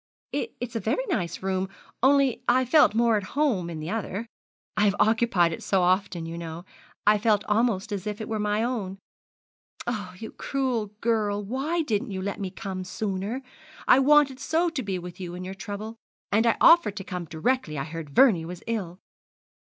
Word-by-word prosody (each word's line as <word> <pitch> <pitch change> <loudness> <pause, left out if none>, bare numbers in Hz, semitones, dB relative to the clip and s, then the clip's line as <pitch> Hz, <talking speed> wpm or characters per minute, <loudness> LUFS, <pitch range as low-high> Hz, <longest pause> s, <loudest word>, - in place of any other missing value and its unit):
'It's 245 - -4
a - - +1
very 225 - -1
nice 185 - -2
room; 190 0 -1 0.3
only 275 -2 +4
I 255 +1 +4
felt 295 -4 +5
more 230 -1 +4
at - - -1 0.2
home 230 - +1
in 165 -2 -5
the 155 +4 -4
other. 220 0 -3 0.5
I 210 - +3
have 200 -1 +3
occupied 220 -6 +3
it - - -6
so 190 -2 +1
often, 180 -2 +1
you 165 +1 -6
know, 165 +1 -7 0.4
I 210 0 +5
felt 210 -1 +2
almost 210 -2 +1
as 200 -1 -3
if 210 0 -3
it 220 - -5
were 220 -1 -2
my 210 +1 +1
own. 215 -6 -2 0.9
Oh, 205 -7 -4
you 220 +3 -7
cruel 255 -6 -1
girl! 210 -3 +1
why 275 +10 -1
didn't 215 -8 -1
you 190 -2 -4
let 200 0 -3
me 195 -2 -3
come 190 -1 -5
sooner? 200 +6 -3 0.4
I 255 - +7
wanted 280 -1 +4
so 335 +4 +1
to 310 -5 -3
be 195 -5 -2
with 180 0 -8
you 175 -2 -6
in 180 - -6
your 185 +1 -5
trouble; 210 +3 -6 0.3
and 220 +3 +3
I 230 - +3
offered 335 -12 +6
to 195 - -4
come 180 -2 -5
directly 165 - -1
I 135 - -1
heard 160 -1 -7
Vernie 180 - +5
was 175 +1 -8
ill!' 195 -7 -3
210 Hz, 190 wpm, -26 LUFS, 185-240 Hz, 0.9 s, I